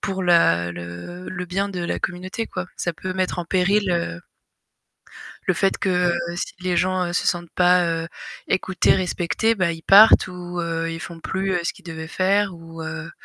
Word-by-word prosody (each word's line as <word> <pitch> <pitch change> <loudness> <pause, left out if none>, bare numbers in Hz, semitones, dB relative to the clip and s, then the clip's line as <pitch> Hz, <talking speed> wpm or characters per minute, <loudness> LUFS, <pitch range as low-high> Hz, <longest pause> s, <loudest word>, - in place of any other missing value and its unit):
pour 190 -1 -2
la 85 - +4
le 85 - -8
le 180 -1 -4
bien 195 +3 -1
de 185 -3 -5
la 175 - -2
communauté, 185 +5 -3
quoi. 185 -1 -4
Ça 175 - -2
peut 185 +3 -5
mettre 185 -1 -1
en - - -5
péril, 195 +2 +2
heu 85 - -2 1.3
le - - +2
fait 195 - +1
que, - - -1 0.2
heu, 170 0 -3
si - - -4
les 180 -1 -1
gens, 185 0 +1
heu, 175 - -4
se - - 0
sentent 175 -2 -1
pas, 180 0 +4
heu, 165 0 -2 0.4
écoutés, 185 0 +2
respectés, 185 +3 0
bah 185 -5 +1
ils 165 0 -9
partent 205 +6 +8
ou, 180 -1 -6
heu, 165 -1 -2
ils 165 - -6
font 170 0 -8
plus, 190 +2 -2
heu, 175 - +1
ce - - -1
qu'ils - - -19
devaient 160 -1 -6
faire 195 +2 +1
ou, 165 -1 -10
heu, 165 +1 -6
175 Hz, 200 wpm, -22 LUFS, 165-185 Hz, 1.3 s, partent